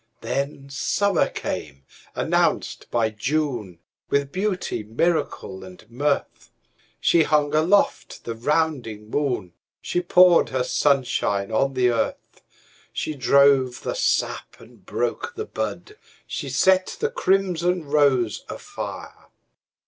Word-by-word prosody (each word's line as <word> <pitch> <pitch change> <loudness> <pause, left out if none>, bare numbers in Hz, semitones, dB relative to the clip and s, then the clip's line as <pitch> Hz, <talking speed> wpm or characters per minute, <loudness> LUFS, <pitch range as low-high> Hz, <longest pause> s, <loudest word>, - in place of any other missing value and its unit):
Then 140 0 -3
summer 200 +7 +1
came, 70 -3 -5 0.3
announced - - 0
by 115 -2 +1
June, 120 - -2 0.3
With 140 0 0
beauty, 190 - -2
miracle 110 - -2
and 90 -1 -13
mirth. 140 +4 -2 0.5
She 170 - +4
hung 150 -2 +2
aloft 170 +7 +1
the 115 - -4
rounding 120 -5 -1
moon, 125 -12 -1 0.3
She 175 - -2
poured 180 0 +5
her 130 -1 0
sunshine 125 -8 +1
on 135 +4 +1
the 125 -1 +3
earth, 115 - -3 0.5
She 155 - -3
drove 135 -1 +3
the - - -2
sap - - -1
and - - -17
broke 470 +1 -3
the 435 - -4
bud, 420 0 -5 0.3
She - - -5
set 185 0 +2
the 450 +1 0
crimson 180 - +1
rose 140 -6 +2
afire. - - -8
140 Hz, 115 wpm, -23 LUFS, 120-175 Hz, 0.5 s, poured